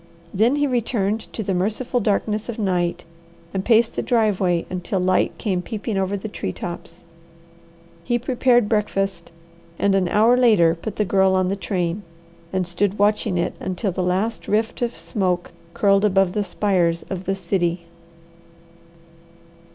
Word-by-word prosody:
Then 225 Hz, +8 st, +3 dB
he 290 Hz, 0 st, +1 dB
returned 225 Hz, -4 st, -1 dB
to 220 Hz, -, -4 dB
the 195 Hz, -, -1 dB
merciful 220 Hz, +7 st, -1 dB
darkness 215 Hz, +1 st, -1 dB
of 235 Hz, -, -4 dB
night, 180 Hz, -5 st, -1 dB, 0.5 s
and 190 Hz, -1 st, -1 dB
paced 225 Hz, +1 st, +3 dB
the -, -, 0 dB
driveway 195 Hz, -7 st, +1 dB
until 185 Hz, +1 st, -3 dB
light 185 Hz, 0 st, +1 dB
came 185 Hz, -5 st, -1 dB
peeping 215 Hz, +2 st, -4 dB
over 195 Hz, +1 st, 0 dB
the 200 Hz, -, -6 dB
tree 150 Hz, -, -4 dB
tops. 170 Hz, -, -8 dB, 1.0 s
He 240 Hz, +7 st, +1 dB
prepared 245 Hz, -2 st, +2 dB
breakfast 195 Hz, -5 st, -1 dB, 0.5 s
and 200 Hz, -, +2 dB
an 190 Hz, -2 st, +2 dB
hour 220 Hz, +6 st, +4 dB
later 215 Hz, -10 st, +5 dB
put 195 Hz, +5 st, -6 dB
the 210 Hz, -, 0 dB
Girl 190 Hz, 0 st, +3 dB
on 185 Hz, -1 st, +2 dB
the 195 Hz, -, 0 dB
train, 180 Hz, -1 st, -2 dB, 0.5 s
and 185 Hz, -1 st, 0 dB
stood 185 Hz, +4 st, -1 dB
watching 205 Hz, -2 st, +2 dB
it 175 Hz, -, -1 dB
until 190 Hz, +2 st, -2 dB
the 185 Hz, -, -3 dB
last 190 Hz, +6 st, -1 dB
rift 220 Hz, +3 st, 0 dB
of 240 Hz, -1 st, -2 dB
smoke 180 Hz, -4 st, -1 dB, 0.2 s
curled 200 Hz, -1 st, +3 dB
above 195 Hz, -3 st, +3 dB
the 210 Hz, -, 0 dB
spires 180 Hz, -5 st, 0 dB
of 185 Hz, -1 st, -6 dB
the 195 Hz, -, 0 dB
city. 175 Hz, -3 st, -1 dB
195 Hz, 155 wpm, -22 LUFS, 180-220 Hz, 1.0 s, later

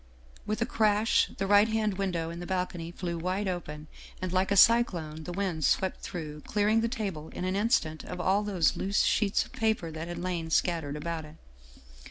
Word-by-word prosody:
With 215 Hz, +2 st, 0 dB
a -, -, -1 dB
crash 215 Hz, -1 st, +2 dB
the 195 Hz, -, -1 dB
right 205 Hz, +2 st, +5 dB
hand 215 Hz, -3 st, -1 dB
window 170 Hz, -4 st, -1 dB
in 170 Hz, -, -7 dB
the 175 Hz, -, -6 dB
balcony 180 Hz, -3 st, -2 dB
flew 170 Hz, -1 st, -4 dB
wide 185 Hz, +4 st, -1 dB
open, 155 Hz, -5 st, -4 dB, 0.3 s
and 185 Hz, -1 st, -4 dB
like 185 Hz, +1 st, +2 dB
a 200 Hz, -, +3 dB
cyclone, 170 Hz, -9 st, +4 dB
the 180 Hz, -, -5 dB
wind 180 Hz, -4 st, -2 dB
swept 190 Hz, +6 st, +1 dB
through, 155 Hz, -5 st, -6 dB
clearing 210 Hz, +6 st, +2 dB
the 230 Hz, -, +1 dB
table 195 Hz, -10 st, -4 dB
in 180 Hz, -, -3 dB
an 185 Hz, +1 st, -1 dB
instant 200 Hz, -8 st, +1 dB
of 180 Hz, -, -6 dB
all 190 Hz, +3 st, +2 dB
the 190 Hz, -7 st, +2 dB
loose 200 Hz, +2 st, +1 dB
sheets 205 Hz, -2 st, +2 dB
of -, -, -17 dB
paper 220 Hz, -7 st, 0 dB
that 160 Hz, +1 st, -6 dB
had 175 Hz, 0 st, -5 dB
lain 175 Hz, -2 st, -3 dB
scat 170 Hz, 0 st, +1 dB
tered 145 Hz, 0 st, -5 dB
about 160 Hz, +1 st, -4 dB
it. 155 Hz, +1 st, -13 dB
185 Hz, 205 wpm, -29 LUFS, 165-205 Hz, 0.3 s, right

